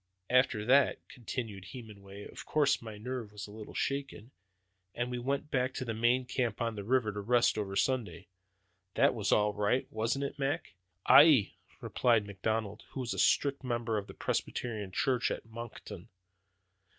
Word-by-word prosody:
"After 125 -4 +3
that," 135 +4 +3
continued 115 -5 -6
Hemenway, 100 -5 -10
"of - - -9
course 145 -2 +2
my 110 -2 -8
nerve 120 -1 -5
was 105 -1 -7
a 105 - -12
little 110 0 -10
shaken, 135 -4 -3 0.6
and 120 +1 -2
we 125 - -3
went 140 +4 -2
back 130 -1 0
to 130 - -3
the 115 - -2
main 120 +3 +2
camp 125 -4 -2
on 115 -1 -1
the 105 -2 -6
river, 120 0 +1
to 105 - -6
rest 120 +4 +3
over 100 -2 -3
Sunday. 110 -9 -1 0.7
That - - +4
was - - -1
all 105 0 +3
right, 105 +5 +1
wasn't 115 +6 -1
it, 140 - -6
Mac!" 140 -3 -2 0.3
"Aye!" 145 -8 +7 0.3
replied 115 -4 +2
McLeod, 105 +1 -2
who 135 - -3
was 125 -1 -2
a - - -4
strict 140 -1 +2
member 120 -2 -1
of 100 - -9
the - - -11
Presbyterian 110 -5 -3
church 130 +3 +1
at - - -4
Moncton. 115 +1 -9
115 Hz, 170 wpm, -31 LUFS, 105-130 Hz, 0.7 s, Aye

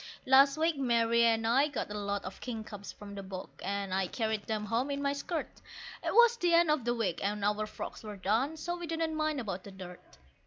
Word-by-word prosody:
Last 275 +2 +6
week 320 -1 +1
Mary 235 -3 +3
and 225 -1 +2
I 260 +6 +4
got 275 -7 -4
a 210 - -3
lot 200 0 -2
of 185 - -8
kingcups 220 -4 -6
from 205 -1 -11
the 200 - -6
bog, 190 -1 -7
and 200 -1 -2
I 190 -1 +1
carried 220 0 -2
them 215 -1 -2
home 230 +6 0
in 280 0 -2
my 280 0 0
skirt; 315 +3 -4 0.4
It - - 0
was 475 0 +6
the 350 -6 +3
end 335 -2 +5
of 295 -6 0
the 240 0 +1
week, 190 -7 -1
and 205 0 -1
our 210 +1 +1
frocks - - -7
were 210 -2 -7
done, 230 +11 0
so 345 +3 -3
we 345 -1 -6
didn't 325 0 -1
mind 310 -2 0
about 195 -6 -4
the - - -10
dirt. 185 - -11
230 Hz, 230 wpm, -31 LUFS, 205-285 Hz, 0.4 s, Last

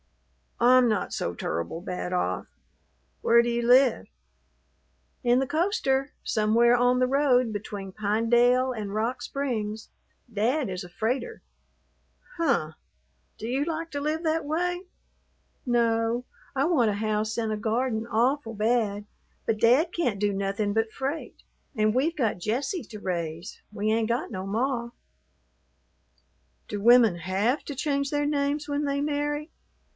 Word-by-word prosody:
"I'm 250 +1 +6
not 215 -3 0
so - - -2
tur'ble 85 - -3
bad 180 0 -4
off. 180 - -1 0.7
Where 235 0 +5
do 240 - -1
you 235 0 -1
live?" 255 +1 +5 1.2
"In 245 +1 +4
the 265 - 0
coaster, 295 - 0
somewhere 230 +2 +3
on 245 +1 +3
the 255 - +3
road 255 -3 +3
between 200 -1 -6
Pinedale 235 +5 +2
and 210 -4 -5
Rock 230 +4 -1
Springs. 220 -6 -3 0.4
Dad 235 +5 0
is 185 +1 -4
a 180 - -10
freighter." 240 +6 -2 1.0
"Huh! 270 - +1 0.7
Do 220 - -5
you 265 +4 0
like 330 0 -4
to 285 - -3
live 310 +3 -1
that 320 -1 0
way?" 355 +4 -1 0.8
"No; 235 0 +1 0.3
I 270 +1 +2
want 260 -10 +3
a - - -2
house 215 +1 -1
and 225 -2 -1
a 215 - -1
garden 225 +1 -1
awful 235 +2 +1
bad, 210 -2 0 0.4
but 220 -1 0
Dad 260 +10 +4
can't 245 - -1
do 205 0 +1
nothin' 200 +1 -1
but 225 0 0
freight 275 +7 -5 0.3
and 215 0 +2
we've 295 +7 +1
got 225 -10 0
Jessie 265 - -2
to 215 -1 -10
raise. 170 -1 -4
We 210 +1 -1
ain't 225 0 +1
got 235 +1 -1
no 190 -2 -5
ma." 235 +3 -1 1.8
"Do 205 -1 -4
women 230 -4 +6
have 195 - 0
to 285 - -6
change 280 0 -1
their 290 0 0
names 290 0 -1
when 290 0 -1
they 280 0 -1
marry?" 295 +1 -2
235 Hz, 145 wpm, -26 LUFS, 215-280 Hz, 1.8 s, I'm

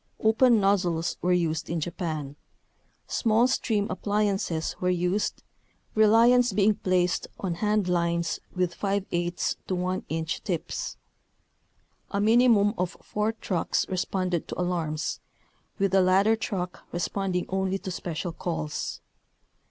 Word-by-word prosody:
Open 225 +1 +4
nozzles 180 -4 +1
were 180 - +1
used 165 -3 0
in 170 0 -1
Japan. 155 -4 -4 0.7
Small 230 +1 +2
stream 220 -5 0
appliances 195 -4 -1
were 180 - +2
used, 180 +3 0 0.5
reliance 230 +2 +5
being 210 +2 +4
placed 180 -2 0
on 185 -3 -2
hand 210 +2 +1
lines 170 -1 0 0.2
with 180 -1 0
% - - -25
to 185 -2 -1
1 185 +1 -2
inch 160 +1 -3
tips. 180 -7 -3 1.1
A 200 - -1
minimum 220 -1 +5
of 180 -1 -2
four 210 +2 -1
trucks 185 -6 -1
responded 185 -2 -1
to - - -6
alarms, 165 -4 -1 0.6
with 195 -2 +1
the 190 0 +5
ladder 195 +4 +4
truck 185 -5 -4
re - - -3
sponding 180 +1 -1
only 190 0 0
to 190 -1 -6
special 175 0 -4
calls. 75 - -4
185 Hz, 125 wpm, -27 LUFS, 175-210 Hz, 1.1 s, reliance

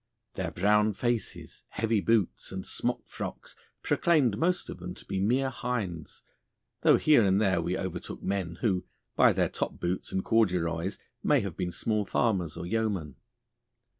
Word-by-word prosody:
Their - - -2
brown 105 +3 +3
faces, 120 +2 -3
heavy 110 -1 0
boots, 110 -3 +1
and 95 -1 -4
smockfrocks - - -4 0.3
proclaimed 145 -11 +3
most 180 - 0
of - - -7
them 90 +1 -6
to - - -14
be 95 - -2
mere 130 +7 +2
hinds, 100 -13 -4 0.6
though - - +6
here 150 -7 +5
and 95 0 +3
there 95 -5 +2
we 90 +2 -1
overtook 95 -2 -5
men 95 -4 -2
who, 95 -5 +1 0.3
by - - +6
their - - +2
top - - -4
boots 90 +1 -2
and 95 - -1
corduroys, 90 -5 +1 0.2
may 145 -3 +3
have 100 -5 -5
been 90 -2 -2
small 105 +5 0
farmers 95 -6 0
or 85 - -5
yeomen. 100 - -1
100 Hz, 155 wpm, -29 LUFS, 90-115 Hz, 0.6 s, though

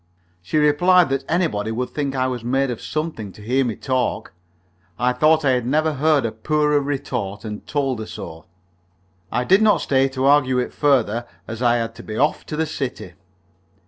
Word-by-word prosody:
She 90 - -2
replied 170 +4 +4
that 135 0 -1
anybody 155 - 0
would 125 +3 -3
think 140 -2 -3
I 130 -1 +1
was 125 -2 -3
made 135 +2 0
of 120 - -6
something 155 -10 -4
to - - -14
hear 130 +5 +1
me 115 -4 -2
talk. 130 -2 -2 0.6
I 125 +1 +1
thought 155 +4 +3
I 135 - +4
had 125 -2 0
never 155 +3 +1
heard 150 -1 +2
a 115 - -1
poorer 150 +6 +1
retort, 125 -7 -4
and 105 -1 -7
told 135 -5 -1
her 110 - -6
so. 80 0 -9 0.9
I 125 - 0
did 190 +10 +4
not 215 -1 +4
stay 135 -1 +2
to 130 0 -2
argue 135 -2 +4
it 125 - -2
further, 120 -5 +1 0.2
as 115 +1 -6
I 120 -1 +3
had 115 -1 -2
to - - -11
be 110 0 -7
off 150 +2 0
to 155 - -4
the 160 +1 0
city. 130 - -5
130 Hz, 195 wpm, -21 LUFS, 120-150 Hz, 0.9 s, replied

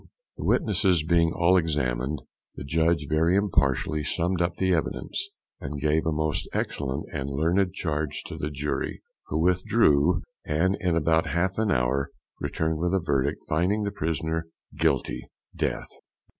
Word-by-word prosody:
The - - -5
witnesses 90 -6 +3
being 85 0 +3
all 90 +2 +4
examined, 75 -4 -1 0.3
the - - -7
judge 80 +2 +1
very 80 +4 +3
impartially 75 -5 +1
summed 85 +4 0
up 85 0 0
the 95 -1 +2
evidence, 390 - -2 0.3
and 70 +1 -5
gave 75 +3 +1
a - - +2
most 80 0 -1
excellent 70 +1 -2
and 70 -2 -3
learned 85 +7 +1
charge 75 -2 -2
to 85 - -7
the 75 -1 -3
jury, 75 -1 -3 0.2
who 75 - -2
withdrew, 85 -2 +3 0.2
and 85 +5 +1
in 90 -3 +1
about 80 0 +2
half 85 +7 0
an 110 -1 +1
hour 65 -2 +1 0.3
returned 80 -1 -1
with 90 +3 +1
a - - +3
verdict, 70 -5 0
finding 90 +7 +1
the 100 - -1
prisoner 80 -2 -2 0.3
"Guilty," - - 0 0.3
DEATH. - - -2
80 Hz, 150 wpm, -26 LUFS, 75-90 Hz, 0.3 s, all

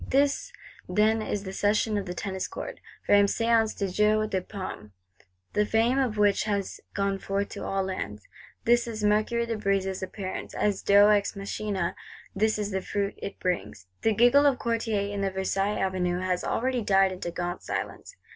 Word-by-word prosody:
This, 285 - +1 0.4
then, 215 +4 +3
is 205 -2 -3
the 190 -1 -6
Session 210 +2 +1
of 200 -2 -2
the 180 - -4
Tennis 190 0 -3
Court, - - -7 0.3
famed 205 0 +5
Séance 230 -1 +2
du 200 - 0
Jeu 210 +3 +2
de 190 -3 -1
Paume; 180 - -7 0.6
the 210 - +3
fame 230 +5 +2
of 245 -5 0
which 205 0 +3
has 200 -2 -2
gone 200 -1 0
forth 195 +1 -2
to - - -7
all 195 0 -1
lands. 105 - -5 0.4
This 240 0 +4
is 220 -2 -5
Mercurius 215 +3 +2
de 225 - -1
Brézé's 195 -2 0
appearance 190 0 -5
as 205 -2 0
Deus 205 +1 +6
ex 205 -1 +1
machinâ; 200 -3 -3 0.4
this 215 +2 +2
is 210 -1 -2
the 190 0 -1
fruit 200 +1 -2
it 200 - -7
brings! 180 - -2 0.2
The 220 -1 +2
giggle 245 +6 +6
of 270 -3 +3
Courtiers 225 -4 -1
in 200 - -2
the 195 - +1
Versailles 195 +2 -1
Avenue 180 -2 0
has 185 -1 -1
already 255 0 0
died 195 -2 +4
into 180 -2 -4
gaunt 175 +1 -4
silence. - - -5
205 Hz, 180 wpm, -27 LUFS, 190-220 Hz, 0.6 s, Deus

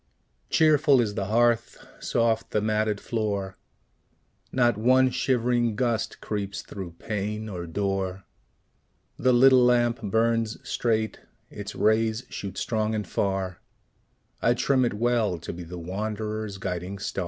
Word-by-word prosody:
Cheerful 150 -3 +4
is 110 -4 +1
the 100 - -2
hearth, 120 +2 +2 0.2
soft 115 -1 0
the 105 - +1
matted 105 -1 0
floor; 100 -4 -2 1.0
Not 120 -3 +3
one 130 +4 +4
shivering 120 -3 +1
gust 115 -1 -1
creeps 100 -1 -4
through 95 -4 -8
pane 105 +3 -4
or 90 -4 -6
door; 95 +1 -2 1.0
The 130 - +3
little 130 +1 +6
lamp 120 -1 +3
burns 115 +1 +1
straight, 110 -2 0 0.3
its - - -7
rays 110 +2 +2
shoot 100 -2 -6
strong 110 -1 -1
and 105 -1 -3
far: 95 -2 -2 0.8
I - - +3
trim 130 -2 +2
it 120 - -1
well, 115 -4 +1
to 85 - -7
be 90 - -8
the 85 +1 -8
wanderer's 105 +3 -4
guiding 95 0 -4
star. 95 - -4
110 Hz, 130 wpm, -26 LUFS, 100-120 Hz, 1.0 s, little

